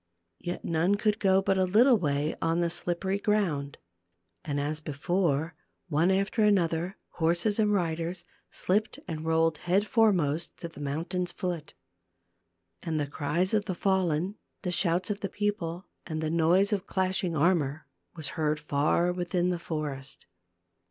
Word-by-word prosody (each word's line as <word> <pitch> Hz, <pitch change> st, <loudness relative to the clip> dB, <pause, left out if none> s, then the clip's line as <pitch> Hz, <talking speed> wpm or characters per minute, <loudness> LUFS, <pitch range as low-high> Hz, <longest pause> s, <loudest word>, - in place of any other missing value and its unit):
Yet 175 Hz, -, -5 dB
none 170 Hz, +4 st, +2 dB
could 210 Hz, +1 st, +1 dB
go 190 Hz, -1 st, +3 dB
but 190 Hz, 0 st, +2 dB
a -, -, +4 dB
little 230 Hz, +8 st, +5 dB
way 150 Hz, -5 st, 0 dB
on 165 Hz, +1 st, +1 dB
the 170 Hz, -1 st, +1 dB
slippery 185 Hz, +3 st, -1 dB
ground, 170 Hz, -10 st, 0 dB, 0.7 s
and 145 Hz, +5 st, -2 dB
as 150 Hz, +2 st, -2 dB
before 160 Hz, +1 st, 0 dB, 0.4 s
one 160 Hz, +3 st, +3 dB
after 195 Hz, +4 st, +1 dB
another, 180 Hz, -3 st, +2 dB
horses 175 Hz, +6 st, +1 dB
and 210 Hz, -1 st, +3 dB
riders, 170 Hz, -1 st, -1 dB, 0.2 s
slipped 210 Hz, +4 st, 0 dB
and 160 Hz, -2 st, -5 dB
rolled 160 Hz, -1 st, +2 dB
head 190 Hz, +4 st, +2 dB
foremost 180 Hz, -, +2 dB
to 170 Hz, -, -6 dB
the 160 Hz, -, -13 dB
mountain's 165 Hz, +5 st, -2 dB
foot. 175 Hz, -6 st, -4 dB, 1.1 s
And 160 Hz, -2 st, -2 dB
the 145 Hz, -, 0 dB
cries 155 Hz, +7 st, -1 dB
of 210 Hz, -1 st, +2 dB
the 185 Hz, -, -3 dB
fallen, 185 Hz, 0 st, 0 dB, 0.2 s
the 180 Hz, -, -1 dB
shouts 175 Hz, +2 st, +1 dB
of 205 Hz, -, -3 dB
the 195 Hz, -, -3 dB
people, 200 Hz, -4 st, -2 dB, 0.2 s
and 155 Hz, -3 st, -3 dB
the 155 Hz, 0 st, -1 dB
noise 175 Hz, +5 st, +3 dB
of 195 Hz, -1 st, -2 dB
clashing 185 Hz, -2 st, 0 dB
armor 155 Hz, -2 st, +1 dB, 0.3 s
was 160 Hz, -4 st, -4 dB
heard 155 Hz, -1 st, -1 dB
far 150 Hz, +5 st, +1 dB
within 180 Hz, 0 st, 0 dB
the 175 Hz, -, -2 dB
forest. 145 Hz, -5 st, -5 dB
175 Hz, 150 wpm, -28 LUFS, 155-190 Hz, 1.1 s, little